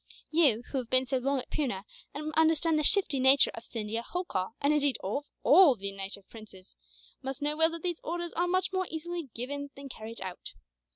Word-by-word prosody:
"You, 285 -8 +3
who 275 - 0
have 240 -3 -7
been 255 0 +4
so 260 0 -1
long 275 +2 0
at 255 - -4
Poona, 245 -11 -2 0.3
and 305 +1 -5
understand 320 0 +3
the - - 0
shifty 300 -5 +4
nature 265 +1 +5
of 230 - -8
Scindia, 225 0 -4
Holkar, 235 - -3
and 285 +2 +2
indeed 285 -4 +2
of 280 +10 -3 0.2
all 315 -4 +7
the 200 -2 -5
native 195 0 -7
princes, 210 -4 -14 0.5
must 270 +1 -5
know 295 +1 0
well 320 +1 +5
that 335 -1 -7
these 350 -2 -2
orders 345 +1 -4
are 350 +1 0
much 370 +1 0
more 375 -1 -1
easily 330 -1 -5
given 285 +4 -4
than 275 0 -9
carried 225 -1 -8
out. 185 -2 -7
280 Hz, 205 wpm, -29 LUFS, 230-320 Hz, 0.5 s, all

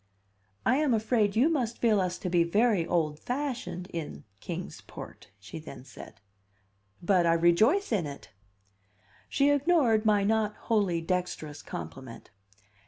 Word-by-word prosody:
"I 260 - +3
am 290 -5 +2
afraid 215 -2 +1
you 245 +7 +4
must 250 -8 -1
feel 215 -4 +3
us 180 -1 -2
to - - -5
be 175 -1 +4
very 200 0 +2
old 155 -3 0
fashioned 245 - -4
in, 150 - -6 0.2
Kings - - -6
Port," - - -11
she 110 +10 -9
then 135 -5 -11
said. 125 -5 -12 0.8
"But 180 -2 +3
I 165 - +4
rejoice 175 - +3
in 190 -9 +1
it!" 140 -5 -10 1.0
She 285 +1 +3
ignored 285 -7 +3
my 210 -2 +3
not 215 0 +1
wholly 200 -7 0
dexterous 165 -4 -3
compliment. 115 +11 -9
195 Hz, 140 wpm, -28 LUFS, 165-235 Hz, 1.0 s, you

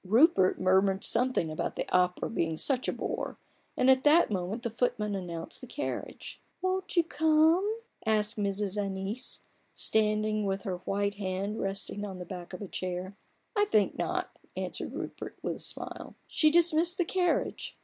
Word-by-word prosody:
Rupert 215 - +4
murmured 190 +1 +3
something 250 -10 +2
about 155 - -3
the - - -3
opera 180 0 +2
being 165 -8 -1
such 255 - +1
a - - +2
bore, - - -4 0.4
and 255 - +3
at 260 0 +5
that 305 -2 +5
moment 195 +4 -2
the 235 - -2
footman 215 -3 0
announced 175 0 -4
the 255 - -9
carriage. 290 +4 -5
" - - -46
Won't 375 0 -1
you 340 - +6
come? 320 +7 +3
" - - -46
asked 210 -1 +2
Mrs. 205 0 -1
Annice, 195 +6 -4 0.3
standing 215 -1 +2
with 195 0 -2
her 190 -5 -2
white 200 +2 -1
hand 195 +2 -2
resting 195 +1 -2
on 195 -3 -5
the 180 - -7
back 175 -1 -8
of 185 +2 -6
a - - -6
chair. 185 +1 -4 0.4
il 410 - +3
I - - +5
think 215 - +2
not/' - - -2 0.2
answered - - -4
Rupert, - - -6
with - - -2
a - - -12
smile. - - -4
She 310 - +3
dismissed 340 +1 +4
the 355 - +1
carriage. 360 0 -1
210 Hz, 175 wpm, -30 LUFS, 190-290 Hz, 0.4 s, you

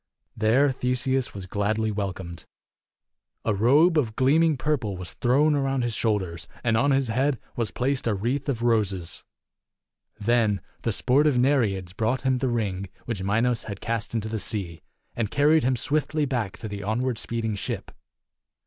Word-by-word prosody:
There 120 +6 +3
Theseus 125 0 -1
was 95 -2 -5
gladly 105 +3 0
welcomed. 95 -4 -5 1.0
A 115 - +2
robe 145 - +4
of 110 -6 -2
gleaming 150 +3 +3
purple 130 -8 -1
was 90 -1 -7
thrown 140 +5 +3
around 135 -2 0
his 120 -1 -1
shoulders, 95 -8 -1 0.2
and 115 -2 +2
on 120 +6 +3
his 135 -3 +2
head 130 +3 +1 0.2
was 115 -3 -1
placed 130 0 -1
a 110 - +2
wreath 130 +8 -1
of 120 -4 -1
roses. 100 -7 0 1.0
Then 110 -2 +2 0.2
the 115 - 0
sportive 135 +5 +3
Nereids 110 -9 +1
brought 115 +6 0
him 130 -1 +2
the 130 - 0
ring 100 -5 -2 0.2
which 115 -5 -3
Minos 115 +5 +1
had 100 -3 -6
cast 115 0 -3
into 110 -1 -1
the 110 0 -3
sea, 95 -6 -4 0.3
and 115 -3 -1
carried 150 +2 +4
him 130 +1 +2
swiftly 150 +4 0
back 120 -8 -2
to 110 - -6
the 100 -1 -6
onward 115 +3 -1
speeding 115 -2 -2
ship. 100 - -4
115 Hz, 160 wpm, -25 LUFS, 105-130 Hz, 1.0 s, robe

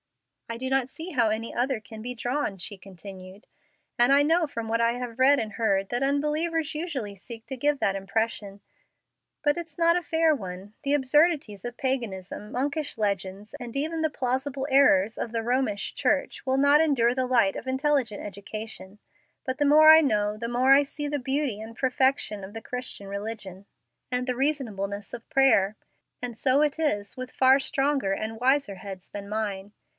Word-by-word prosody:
"I 230 - -4
do 260 +2 -4
not 265 -1 +1
see 325 +6 -8
how 240 -7 +2
any 220 +2 -3
other 250 0 0
can 220 0 -11
be 250 +2 -4
drawn," 245 -3 -2
she 195 +2 -8
continued; 190 +1 -12 0.5
"and 240 +2 +5
I 280 +1 +6
know 325 +2 +2
from 230 -5 -5
what 230 +1 0
I 230 0 +3
have 245 -2 -6
read 275 +2 +5
and 215 -1 -4
heard 195 -4 0
that 245 +2 -1
unbelievers 300 +3 0
usually 275 - -4
seek 225 +3 -10
to 265 - -6
give 290 +2 0
that 195 -6 +1
impression. 200 0 -3 0.8
But 290 -1 +3
it's 330 -3 -7
not 335 0 +4
a 355 - +1
fair 320 -2 +2
one. 190 -2 -8
The 280 - +1
absurdities 290 - +2
of 240 0 -6
paganism, 210 -7 -3
monkish 285 +3 -2
legends, 200 -1 -2
and 240 0 -7
even 320 +3 -1
the 315 - +2
plausible 265 +1 -2
errors 225 -7 +4
of 230 - -3
the 225 -1 -2
Romish 240 -4 -1
Church, 275 0 -1
will 260 0 +1
not 285 +2 +5
endure 250 -6 +2
the 260 -1 0
light 235 -6 +3
of - - -7
intelligent 265 -5 0
education; 205 0 -8 0.5
but 260 0 -2
the 290 - +3
more 305 +2 +7
I 315 0 +10
know 210 -7 +1
the 230 +2 -5
more 255 +3 +4
I 280 +1 +6
see 290 +1 -5
the 290 0 -2
beauty 265 -4 -1
and 225 0 -9
perfection 260 -5 +1
of 190 +2 -9
the 225 - -6
Christian 250 -4 -7
religion 200 -1 -6 0.4
and 250 +1 -1
the 250 - 0
reasonableness 215 -8 -2
of 235 -1 -9
prayer, 220 -7 +3 0.4
and 245 -2 -5
so 265 +4 +2
it 300 -1 +1
is 205 -11 -1
with 255 0 -7
far 265 +1 +5
stronger 270 -5 0
and 220 +2 -4
wiser 260 -4 +2
heads 190 -1 -9
than 200 0 -8
mine. 205 -2 -3
245 Hz, 185 wpm, -26 LUFS, 210-280 Hz, 0.8 s, I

